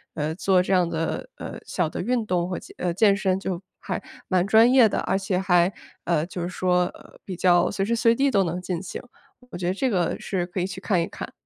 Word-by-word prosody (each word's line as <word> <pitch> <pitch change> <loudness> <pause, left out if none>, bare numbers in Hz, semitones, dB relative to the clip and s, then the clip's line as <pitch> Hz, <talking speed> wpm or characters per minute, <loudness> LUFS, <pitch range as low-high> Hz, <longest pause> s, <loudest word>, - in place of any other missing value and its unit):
呃， 155 +1 -2
做 185 0 +3
这 185 +2 -1
样 180 -2 +3
的， 165 - -3
呃， - - -7
小 175 -4 -1
的 - - -5
运 235 +3 0
动 180 -3 0
和， 185 - -3 0.2
呃， 175 -1 -1
健 200 +1 +4
身 190 -2 0
就 190 -2 -4 0.2
还 - - -4 0.3
蛮 185 -1 +2
专 220 +4 +6
业 250 -4 +6
的， - - -1
而 190 - 0
且 195 -1 -1
还， 180 -1 +3 0.3
呃， 165 -2 +1
就 175 0 -6
是 175 - -2
说， 180 -1 +1
呃， - - -14
比 190 - -6
较 175 -1 +3
随 195 - -1
时 230 +3 0
随 230 0 +4
地 275 +4 +2
都 200 -6 +3
能 175 +1 -2
进 180 -1 -3
行， - - -6 0.5
我 - - -6
觉 175 - -4
得 180 - +1
这 260 +7 0
个 180 -6 0
是 185 -3 -2
可 180 +1 -5
以 180 - 0
去 190 -1 -8
看 185 -5 +1
一 165 - -2
看。 - - -8
185 Hz, 260 characters per minute, -24 LUFS, 175-195 Hz, 0.5 s, 专